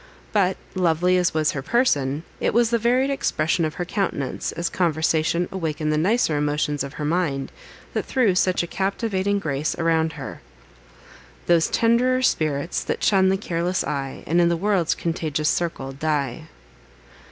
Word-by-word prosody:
But, 190 -3 +2 0.2
lovely 180 0 +2
as 180 -1 +2
was 155 -1 +2
her 135 - -4
person, 145 - +1 0.2
it - - 0
was 235 -1 +3
the 235 - +2
varied 250 +4 +2
expression 165 - 0
of 155 - -4
her 175 - -3
countenance, 175 -9 -2
as 170 +1 -2
conversation 165 0 +1
awakened 155 -4 -2
the - - +2
nicer 190 -2 +2
emotions 145 -1 0
of 140 0 -7
her 150 - -4
mind, 150 -4 -1 0.4
that - - -1
threw 245 -8 +2
such 185 -1 +2
a - - -4
captivating 195 +1 -1
grace 150 -5 -2
around 160 -1 +1
her: - - -8 1.0
Those 170 -2 +4
tend'rer 250 +3 +2
tints, 155 - 0
that - - -3
shun 190 -2 +4
the 190 - +2
careless 180 -1 -1
eye, 135 -2 -4
And, 170 +3 +2
in 170 - +4
the 170 - +1
world's 190 -2 +1
contagious 155 -3 -1
circle, 165 -6 -2
die. 145 0 -2
170 Hz, 160 wpm, -23 LUFS, 155-190 Hz, 1.0 s, Those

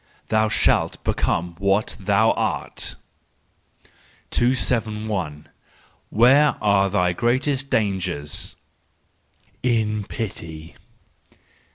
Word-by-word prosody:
—"Thou 110 0 +2
shalt - - +1
become 85 0 -1
what 100 +2 +1
thou 105 +2 +3
art." - - -2 1.4
271. 110 - 0 0.6
Where 135 +6 +5
are 100 -2 +3
thy 90 -2 +1
Greatest 130 - 0
Dangers 95 - -1 1.1
?—In 110 -4 0
pity. 85 -9 -6
105 Hz, 70 wpm, -22 LUFS, 95-115 Hz, 1.4 s, Where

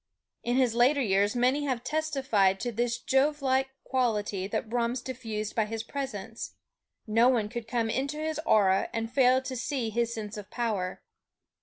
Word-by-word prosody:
In 240 +1 -1
his 255 -3 +3
later 250 +5 +4
years 205 -3 +2
many 255 +4 +2
have 255 -4 -1
testified 265 -11 +1
to 240 - -1
this 235 +1 0
Jovelike 265 0 +1
quality 210 -7 0
that 210 - -2
Brahms 240 +2 0
diffused 225 -4 -5
by 220 - +2
his 225 +1 -4
presence. 225 -5 -5 0.5
No 230 +3 +4
one 225 -5 +1
could 235 0 -6
come 230 -1 0
into 280 +5 -2
his 310 0 -2
aura 195 -7 +3
and 225 0 -3
fail 260 -1 +4
to 260 - -4
feel 250 -2 -2
his 235 +1 0
sense 215 -2 -5
of 205 -1 -8
power. 215 -7 -2
235 Hz, 165 wpm, -28 LUFS, 215-260 Hz, 0.5 s, later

